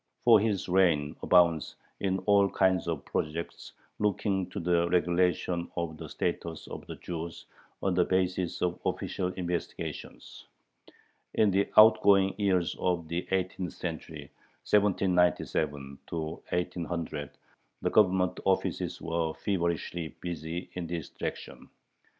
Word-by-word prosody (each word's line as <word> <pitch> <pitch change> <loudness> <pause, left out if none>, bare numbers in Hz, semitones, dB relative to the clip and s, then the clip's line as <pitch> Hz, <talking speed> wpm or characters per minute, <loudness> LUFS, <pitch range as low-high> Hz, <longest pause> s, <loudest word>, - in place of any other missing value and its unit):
For 115 -3 +7
his 105 -3 0
reign 85 -6 +2
abounds 85 -4 +3 0.2
in 95 -1 0
all 100 -1 +5
kinds 95 -3 +2
of 80 -4 -3
projects 80 +2 -4 0.3
looking 100 -2 0
to - - -5
the 85 0 +2
regulation 90 0 +1
of 85 -2 -3
the - - -8
status 80 -2 -3
of - - -8
the - - -6
Jews 85 -1 -6 0.4
on 95 - +2
the 90 0 +4
basis 90 -1 0
of 90 0 -1
official 90 - -2
"investigations." 90 -2 -5 0.9
In 105 -2 +4
the 100 +1 +1
outgoing 100 -3 +7
years 95 -4 +1
of 85 -3 -1
the 85 +2 -3
eighteenth 95 -1 -2
century 80 -3 -6 0.4
(1797 90 -8 +1
1800) 80 -1 -3 0.5
the - - +1
Government 90 -3 +3
offices 95 -1 0
were 80 -1 -2
feverishly 85 -3 -2
busy 85 0 -5
in 90 -2 -4
this 85 -2 -4
direction. - - -6
90 Hz, 120 wpm, -29 LUFS, 85-95 Hz, 0.9 s, For